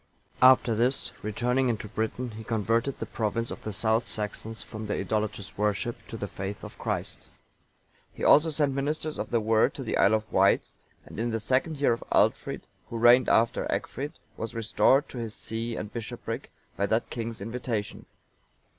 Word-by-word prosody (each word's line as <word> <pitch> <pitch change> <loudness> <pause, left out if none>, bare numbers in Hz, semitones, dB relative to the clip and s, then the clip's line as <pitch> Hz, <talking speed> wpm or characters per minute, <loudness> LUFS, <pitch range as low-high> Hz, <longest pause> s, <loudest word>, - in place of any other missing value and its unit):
After 130 -2 +7
this, 120 +4 +2
returning 125 +5 +1
into 110 -2 -2
Britain,(916) 110 +3 -3
he 110 - -7
converted 115 +4 0
the - - -4
province 115 +1 -2
of - - -7
the 110 - -4
South 110 +3 +2
Saxons 110 +1 -4
from 110 0 -7
their 105 - -1
idolatrous 105 -1 -3
worship 105 +3 0
to 115 - -6
the 100 - -4
faith 95 +1 -6
of - - -10
Christ.(917) - - -2 0.8
He - - -8
also 155 +3 +6
sent 145 -2 +1
ministers 150 +3 -2
of - - -3
the 115 - +2
Word 110 0 +3
to - - -5
the - - -1
Isle 100 +3 +5
of 110 0 -4
Wight;(918) - - +4 0.4
and - - -9
in 120 +1 0
the 115 -1 -1
second 130 +7 0
year 140 -4 +3
of 115 - -5
Aldfrid, - - +2 0.3
who 115 - -4
reigned 120 +2 +6
after 115 +1 +3
Egfrid, 145 +4 -3 0.2
was 115 0 -5
restored 125 +5 +3
to 125 - -7
his 115 -2 -5
see 115 +1 -4
and 105 -1 -6
bishopric 115 -2 -5 0.3
by 100 - 0
that 110 +3 0
king's 115 -1 -4
invitation. 115 0 -4
115 Hz, 180 wpm, -28 LUFS, 110-125 Hz, 0.8 s, After